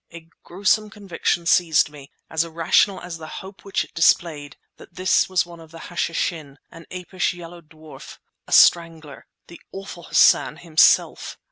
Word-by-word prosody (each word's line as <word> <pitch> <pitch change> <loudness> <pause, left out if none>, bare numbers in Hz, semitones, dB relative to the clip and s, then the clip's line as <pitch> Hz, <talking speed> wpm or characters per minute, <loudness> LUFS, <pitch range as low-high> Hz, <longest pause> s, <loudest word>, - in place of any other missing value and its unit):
A 165 -1 -13
gruesome 205 +4 0
conviction 190 -4 -3
seized 165 -3 +2
me, 145 -2 -14 0.2
as 160 0 -1
irrational 170 +4 +1
as 175 -2 -8
the 155 - -9 0.2
hope 190 -1 -14
which 195 - -2
it - - -17
displayed, 165 -3 +1 0.2
that 175 - -17
this 185 0 +1
was 185 -2 +1
one 170 -1 -13
of 160 -1 -15
the 165 - -13 0.2
Hashishin—an 165 -2 -5
apish 180 0 -3
yellow 175 0 -11
dwarf, 155 -1 -14 0.3
a - - -14
strangler, 165 -4 +2 0.2
the 170 - -15
awful 195 -2 -9
Hassan - - +3
himself! 160 -3 +2
170 Hz, 150 wpm, -21 LUFS, 160-180 Hz, 0.3 s, Hassan